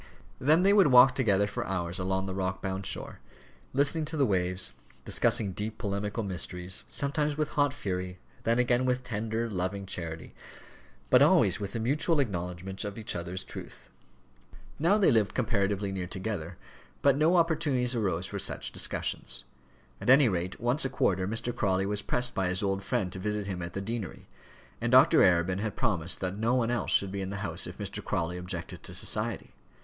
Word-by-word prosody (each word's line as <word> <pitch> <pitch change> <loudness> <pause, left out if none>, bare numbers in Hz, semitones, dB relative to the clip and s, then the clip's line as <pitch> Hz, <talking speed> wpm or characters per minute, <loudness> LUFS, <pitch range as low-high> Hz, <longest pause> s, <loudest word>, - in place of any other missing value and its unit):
Then 155 +7 +4
they 200 +1 +5
would 200 -5 +6
walk 130 0 +7
together 105 -7 +2
for 100 - -4
hours 90 -1 -2
along 95 +1 -1
the 95 - -4
rock 95 -1 -2
bound 95 0 -4
shore, - - -5 0.5
listening 140 +4 +1
to 155 +1 -4
the 140 - +4
waves, 90 -3 0 0.3
discussing 100 -3 +2
deep 105 +4 -4
polemical 105 +1 -3
mysteries, 90 -1 -2
sometimes 145 +1 -1
with 155 -1 0
hot 145 -1 +2
fury, 90 -8 -4 0.3
then 115 +1 +2
again 125 0 +2
with 125 0 0
tender, 115 0 -2
loving 100 -1 -3
charity, 85 -3 -5 0.8
but - - +7
always - - +5
with 100 +2 -5
a - - -1
mutual 145 +7 +1
acknowledgment 95 -4 -3
of 105 0 -5
each 110 - -3
other's 90 +2 -4
truth. - - -11 0.9
Now 170 +7 +4
they 205 - +4
lived 110 -3 +2
comparatively 100 -4 0
near 95 -2 -4
together, 95 -3 -5 0.5
but 140 -1 +5
no 155 +5 +3
opportunities 150 -7 +1
arose 95 -6 -1
for - - -5
such - - -3
discussions. - - -2 0.6
At - - -2
any 135 0 +7
rate 90 -2 -2
once 120 +5 +1
a 135 - 0
quarter 95 -7 +1
Mr. 115 +3 -2
Crawley 95 -1 +1
was 105 +1 -1
pressed 125 0 0
by 95 -1 0
his 90 +2 -1
old 95 0 0
friend 105 -4 -1
to 95 - -5
visit 105 +1 -2
him 95 -2 -4
at 85 0 -6
the 100 - -3
deanery, 110 -3 -5 0.6
and - - 0
Dr. - - +7
Arabin 90 +1 +3
had 105 -1 -3
promised 95 -8 -1
that 95 0 -2
no 115 +3 +2
one 120 -2 +1
else 120 -2 -1
should 100 -1 +2
be 100 0 -3
in 95 - -4
the 100 +1 -4
house - - -2
if - - -9
Mr. - - -6
Crawley 85 +1 -2
objected 90 -2 -6
to - - -6
society. - - -1
100 Hz, 185 wpm, -29 LUFS, 95-125 Hz, 0.9 s, walk